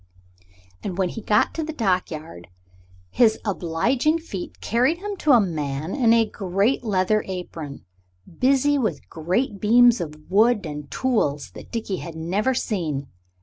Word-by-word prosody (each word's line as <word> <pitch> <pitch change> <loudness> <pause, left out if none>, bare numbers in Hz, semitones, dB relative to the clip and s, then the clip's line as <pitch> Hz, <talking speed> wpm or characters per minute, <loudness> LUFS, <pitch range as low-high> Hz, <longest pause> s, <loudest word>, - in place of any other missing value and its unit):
And 185 -3 -5
when 190 -2 +1
he 225 - -7
got 210 - +2
to 325 - -3
the 315 - -4
dockyard 170 - -2 0.6
his 225 -3 +4
obliging 225 - +1
feet 210 - -7
carried 250 +9 +1
him 405 +2 -5
to 305 -5 +3
a 240 - +7
man 155 -4 -2
in 245 -5 +3
a 230 -1 +5
great 200 +5 0
leather 210 0 +1
apron, 170 -6 -7 0.5
busy 275 +2 +3
with 200 - -2
great 190 +7 -1
beams 240 0 +5
of 155 -3 -5 0.2
wood 215 +1 +4
and 150 -2 -6
tools 145 - 0
that - - -12
Dickie 220 -5 -3
had 170 -2 -8
never 195 +11 0
seen. 155 - -2
200 Hz, 150 wpm, -23 LUFS, 165-245 Hz, 0.6 s, a